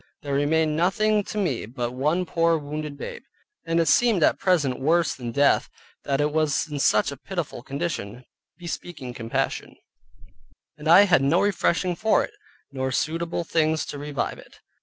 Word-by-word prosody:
There 140 Hz, -1 st, -3 dB
remained 150 Hz, +2 st, +1 dB
nothing 210 Hz, +5 st, +2 dB
to -, -, -6 dB
me 150 Hz, -, -1 dB
but 120 Hz, 0 st, -4 dB
one 150 Hz, +8 st, 0 dB
poor 165 Hz, -1 st, +2 dB
wounded 150 Hz, 0 st, -6 dB
babe, 480 Hz, -, -7 dB, 0.5 s
and 165 Hz, 0 st, +1 dB
it 165 Hz, -, +3 dB
seemed 215 Hz, +1 st, +4 dB
at -, -, +3 dB
present 150 Hz, -9 st, +1 dB
worse 165 Hz, +4 st, +2 dB
than 120 Hz, -2 st, -6 dB
death 140 Hz, +3 st, +3 dB, 0.4 s
that 140 Hz, -1 st, 0 dB
it 150 Hz, 0 st, +1 dB
was 155 Hz, 0 st, +1 dB
in 150 Hz, -2 st, -5 dB
such 110 Hz, -1 st, +3 dB
a 140 Hz, -, -8 dB
pitiful 170 Hz, -3 st, -5 dB
condition, 130 Hz, -5 st, -5 dB, 0.3 s
bespeaking 170 Hz, -6 st, -7 dB
compassion, 115 Hz, -2 st, -3 dB, 1.0 s
and 150 Hz, 0 st, -8 dB
I 175 Hz, +5 st, +8 dB
had 185 Hz, -9 st, +4 dB
no 140 Hz, +6 st, +3 dB
refreshing 185 Hz, -2 st, +1 dB
for 220 Hz, +4 st, +2 dB
it, -, -, -8 dB, 0.4 s
nor 130 Hz, -1 st, -2 dB
suitable 165 Hz, +5 st, -1 dB
things 160 Hz, -2 st, +1 dB
to 145 Hz, -, -7 dB
revive 145 Hz, -2 st, -3 dB
it. -, -, -17 dB
155 Hz, 165 wpm, -24 LUFS, 140-175 Hz, 1.0 s, I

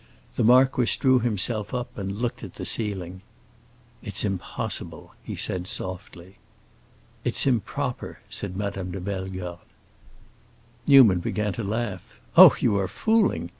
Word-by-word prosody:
The -, -, 0 dB
marquis 125 Hz, +1 st, +4 dB
drew 130 Hz, -2 st, +4 dB
himself 110 Hz, 0 st, -1 dB
up 125 Hz, -1 st, -5 dB
and 95 Hz, -1 st, -4 dB
looked 115 Hz, +4 st, -3 dB
at -, -, -9 dB
the -, -, -6 dB
ceiling. 95 Hz, -4 st, -3 dB, 0.8 s
"It's 105 Hz, +1 st, -2 dB
impossible!" 95 Hz, -3 st, -5 dB
he -, -, -6 dB
said 90 Hz, -1 st, -2 dB
softly. 95 Hz, 0 st, -5 dB, 0.9 s
"It's -, -, +1 dB
improper," 125 Hz, +1 st, -2 dB
said 95 Hz, -2 st, -6 dB
Madame 100 Hz, -2 st, -4 dB
de 95 Hz, +2 st, -5 dB
Bellegarde. 95 Hz, -2 st, -5 dB, 1.3 s
Newman 125 Hz, -10 st, +7 dB
began 105 Hz, +3 st, -2 dB
to 115 Hz, -, -5 dB
laugh. 105 Hz, -3 st, -3 dB, 0.3 s
"Oh, -, -, +10 dB
you 100 Hz, -, +2 dB
are 95 Hz, -, -1 dB
fooling!" 220 Hz, -, +1 dB
100 Hz, 130 wpm, -25 LUFS, 95-120 Hz, 1.3 s, Oh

